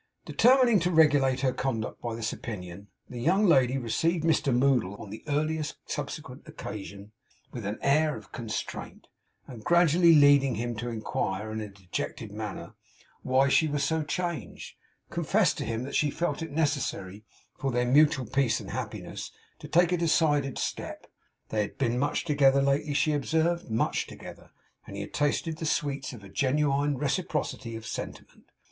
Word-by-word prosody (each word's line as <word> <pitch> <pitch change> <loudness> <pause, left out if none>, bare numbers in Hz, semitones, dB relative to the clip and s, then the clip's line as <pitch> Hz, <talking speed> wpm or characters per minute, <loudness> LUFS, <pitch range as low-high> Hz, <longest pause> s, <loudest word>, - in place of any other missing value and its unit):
Determining 250 -3 +5
to 175 +1 0
regulate 145 -6 +4
her 130 -2 +1
conduct 115 -5 -3
by 115 -2 -3
this 115 -1 -3
opinion, 100 -3 -7 0.2
the 120 -1 -7
young 190 - +3
lady 135 -7 +4
received 160 +7 0
Mr 160 -4 +2
Moddle, 125 -6 +2
on 100 - -9
the 110 - -8
earliest 155 +1 -1
subsequent - - -6
occasion, 100 0 -8 0.4
with 115 -5 -5
an 105 - -3
air 150 +1 +3
of 105 -3 -14
constraint; 115 -3 -6 0.4
and 115 -4 -10
gradually 170 +1 +5
leading 145 -3 +5
him 120 +2 -3
to 120 +2 -3
inquire, 110 -2 -3
in 110 0 -3
a 105 - -5
dejected 95 -2 -5
manner, - - -6 0.5
why 130 +2 +3
she 155 +3 +4
was 145 -1 -1
so 160 +3 +1
changed, 170 -1 -4 0.4
confessed - - +1
to - - -3
him 115 +1 -2
that 140 +2 -7
she 150 - +2
felt 150 0 -2
it 165 - -5
necessary 135 -10 -2 0.3
for 135 - -2
their 125 0 +1
mutual 135 0 +4
peace 130 +1 +1
and - - -8
happiness - - -5 0.3
to - - -9
take 175 +1 +3
a 180 - +2
decided 155 -5 +2
step. - - -4 0.4
They 110 - 0
had 100 - -5
been 125 -2 0
much 145 +2 0
together 140 -3 +4
lately, 140 +1 +1
she 155 +1 +2
observed, 160 +2 0
much 110 - 0
together, - - -11 0.4
and 100 - -8
had 100 - -6
tasted 155 +2 0
the 160 - -2
sweets 140 -3 -1
of 115 -6 -11
a 100 - -11
genuine 140 +2 +1
reciprocity 145 -5 -2
of 110 -1 -8
sentiment. - - -7
140 Hz, 165 wpm, -28 LUFS, 115-155 Hz, 0.5 s, Determining